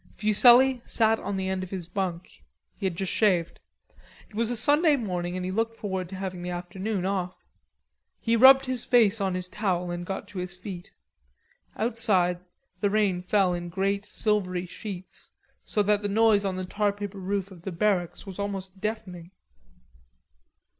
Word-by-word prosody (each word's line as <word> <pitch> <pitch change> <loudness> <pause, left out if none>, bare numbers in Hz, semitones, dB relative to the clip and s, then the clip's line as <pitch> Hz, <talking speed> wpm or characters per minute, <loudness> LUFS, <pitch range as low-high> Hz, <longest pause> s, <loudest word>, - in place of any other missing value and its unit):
Fuselli 245 +4 +6
sat 225 -1 +2
on 200 0 -3
the 190 0 -2
end 190 0 -1
of 185 - -7
his 180 -3 -5
bunk. 180 - -5 0.3
He 195 - -2
had 180 - -3
just 190 +2 -3
shaved. 180 -6 +1 0.7
It - - -15
was 230 +1 +1
a 245 - -1
Sunday 295 +6 +4
morning 180 -7 -3
and 180 - -3
he 185 - -3
looked 225 +3 -1
forward 190 -5 -4
to 195 - -7
having 185 -2 -5
the 180 - -5
afternoon 185 +3 -3
off. 185 -2 -3 0.7
He 230 0 +1
rubbed 265 +3 +8
his 255 -2 -2
face 225 -4 +3
on 190 -2 0
his 180 0 -4
towel 180 -3 -2
and 175 0 -4
got 190 +2 -5
to 195 - -6
his 180 0 -4
feet. 180 -1 -8 0.9
Outside, 200 -6 +1 0.4
the 205 - +1
rain 200 -4 +1
fell 185 0 +2
in 175 0 -4
great 195 +3 -1
silvery 185 -5 0
sheets, 185 0 -9 0.3
so 210 - 0
that 205 0 +2
the 205 - -2
noise 215 -1 +3
on 190 -1 -1
the 185 0 -4
tarpaper 205 0 -2
roof 195 +1 -3
of 180 -3 -13
the 190 - -5
barracks 180 0 0
was 195 -1 -9
almost 195 -1 -4
deafening. 195 -6 -5
195 Hz, 175 wpm, -26 LUFS, 180-215 Hz, 0.9 s, rubbed